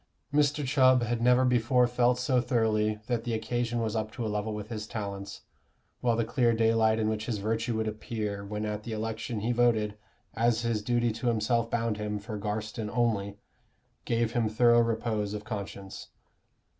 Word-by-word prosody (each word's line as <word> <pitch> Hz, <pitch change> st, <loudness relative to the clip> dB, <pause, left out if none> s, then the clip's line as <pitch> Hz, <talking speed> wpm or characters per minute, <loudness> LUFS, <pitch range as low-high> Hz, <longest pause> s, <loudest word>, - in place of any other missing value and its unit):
Mr. 145 Hz, 0 st, +2 dB
Chubb 130 Hz, -2 st, +4 dB
had 120 Hz, 0 st, -1 dB
never 125 Hz, +2 st, +4 dB
before 125 Hz, 0 st, +3 dB
felt 125 Hz, 0 st, +2 dB
so 125 Hz, 0 st, +2 dB
thoroughly 110 Hz, -3 st, +1 dB
that 120 Hz, -1 st, -1 dB
the 115 Hz, -1 st, -1 dB
occasion 120 Hz, +1 st, -1 dB
was 110 Hz, -1 st, -2 dB
up 110 Hz, -1 st, -2 dB
to 120 Hz, -1 st, -4 dB
a -, -, 0 dB
level 105 Hz, +1 st, -2 dB
with 105 Hz, 0 st, -6 dB
his 110 Hz, -2 st, -5 dB
talents, 100 Hz, -3 st, -6 dB, 0.6 s
while 120 Hz, -2 st, +2 dB
the 115 Hz, 0 st, 0 dB
clear 120 Hz, 0 st, +2 dB
daylight 110 Hz, -1 st, +3 dB
in 110 Hz, -1 st, 0 dB
which 110 Hz, 0 st, -2 dB
his 115 Hz, -, -1 dB
virtue 115 Hz, +2 st, -1 dB
would 110 Hz, 0 st, -1 dB
appear 105 Hz, -2 st, -4 dB
when 105 Hz, +1 st, -4 dB
at 105 Hz, 0 st, -3 dB
the 110 Hz, +1 st, -6 dB
election 110 Hz, 0 st, -3 dB
he 115 Hz, +3 st, 0 dB
voted, 115 Hz, -3 st, +2 dB, 0.4 s
as 115 Hz, 0 st, +1 dB
his 115 Hz, -2 st, 0 dB
duty 120 Hz, +1 st, +1 dB
to 115 Hz, +3 st, -4 dB
himself 115 Hz, 0 st, +1 dB
bound 115 Hz, -3 st, -1 dB
him, 105 Hz, 0 st, -3 dB
for 105 Hz, +2 st, -6 dB
Garstin 110 Hz, +1 st, -3 dB
only, 105 Hz, -3 st, 0 dB, 0.7 s
gave 115 Hz, -1 st, 0 dB
him 115 Hz, -2 st, +1 dB
thorough 120 Hz, +2 st, +5 dB
repose 110 Hz, -3 st, -1 dB
of 105 Hz, -, -6 dB
conscience. 100 Hz, -2 st, -7 dB
115 Hz, 180 wpm, -29 LUFS, 105-120 Hz, 0.7 s, thorough